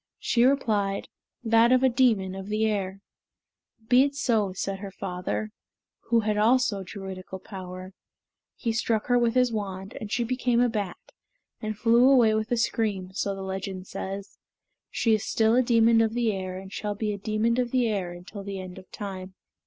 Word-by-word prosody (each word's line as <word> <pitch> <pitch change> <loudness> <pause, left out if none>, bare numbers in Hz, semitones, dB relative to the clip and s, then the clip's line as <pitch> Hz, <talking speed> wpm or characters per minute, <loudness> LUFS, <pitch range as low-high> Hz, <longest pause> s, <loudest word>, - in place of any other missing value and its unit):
She 235 0 +2
replied, 210 -7 +1 0.3
"That 230 +1 +4
of 255 0 +4
a - - +6
demon 235 -7 +2
of 190 0 -7
the 215 +1 0
air." 195 -2 -2 0.9
"Be 250 +2 +6
it 280 +1 +1
so," 225 -8 +1
said 195 +1 -3
her 200 0 -6
father, 190 +2 -4 0.6
who 230 -1 +4
had 210 -1 0
also 225 -2 +3
Druidical 190 -1 -7
power. 185 -1 -9 0.6
He 230 - -2
struck 225 -1 0
her 245 -1 +3
with 235 0 +1
his 250 -1 +3
wand, 195 -2 -5
and 210 -2 -6
she 240 - +1
became 245 0 +1
a 245 0 +4
bat, 205 -5 -3 0.6
and 215 -1 -4
flew 235 +4 +5
away 240 -5 +5
with 215 +1 -1
a 240 - +2
scream, 210 -5 0
and - - -19 0.2
the 195 - -6
legend 190 -1 -5
says, 195 +1 -6 0.5
"She 225 - +1
is 215 -1 +1
still 225 +1 +2
a 255 - +5
demon 230 -2 +4
of 225 0 +1
the 235 -2 +2
air 185 -1 -4
and 190 +1 -10
shall 210 -1 -3
be 210 0 -2
a 200 - -6
demon 220 +4 0
of 245 -1 0
the 250 -1 +2
air 195 -5 -2
until 180 +4 -9
the 195 -1 -5
end 185 0 -8
of 185 - -17
time." 190 -2 -7
215 Hz, 190 wpm, -26 LUFS, 195-235 Hz, 0.9 s, a